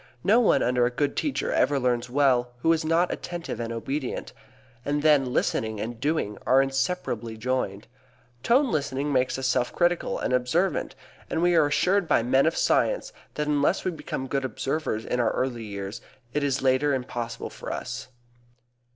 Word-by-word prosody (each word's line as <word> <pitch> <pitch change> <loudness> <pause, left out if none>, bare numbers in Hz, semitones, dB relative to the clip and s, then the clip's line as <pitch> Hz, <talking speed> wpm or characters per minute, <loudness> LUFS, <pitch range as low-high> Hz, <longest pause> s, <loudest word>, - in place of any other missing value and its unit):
No 220 +5 +5
one 240 - +4
under 125 0 +2
a - - 0
good 140 +3 -1
teacher 295 - -1
ever 145 -1 +2
learns 125 -1 0
well 125 -2 +2
who 165 - +5
is 160 0 -1
not 165 +3 +2
attentive 175 -8 -6
and 115 -1 -3
obedient. 130 +4 -4 0.5
And 145 +2 -1
then 145 -5 +4
listening 110 -3 0
and 115 +2 -5
doing 140 -7 -1
are 130 - +4
inseparably 135 -5 -1
joined. 110 -4 -2 0.6
Tone 255 - +3
listening 140 -1 -1
makes 130 0 +1
us 130 - -3
self 125 -1 +1
critical 175 0 +1
and - - -2
observant, 145 +10 0 0.3
and - - -1
we 175 0 +4
are 160 -3 +5
assured 180 +5 +2
by 130 -6 +3
men 130 +4 +3
of 165 - 0
science - - +1 0.2
that 150 - -1
unless 150 +5 +1
we 185 - +1
become 150 -4 -5
good 135 +1 -2
observers 135 -3 -2
in 125 - -1
our 120 - +2
early 120 -3 -2
years, 100 0 -6 0.3
it 150 - 0
is 140 -1 0
later 135 +2 +3
impossible 120 -2 -5
for - - -7
us. - - -5
135 Hz, 175 wpm, -26 LUFS, 125-155 Hz, 0.6 s, No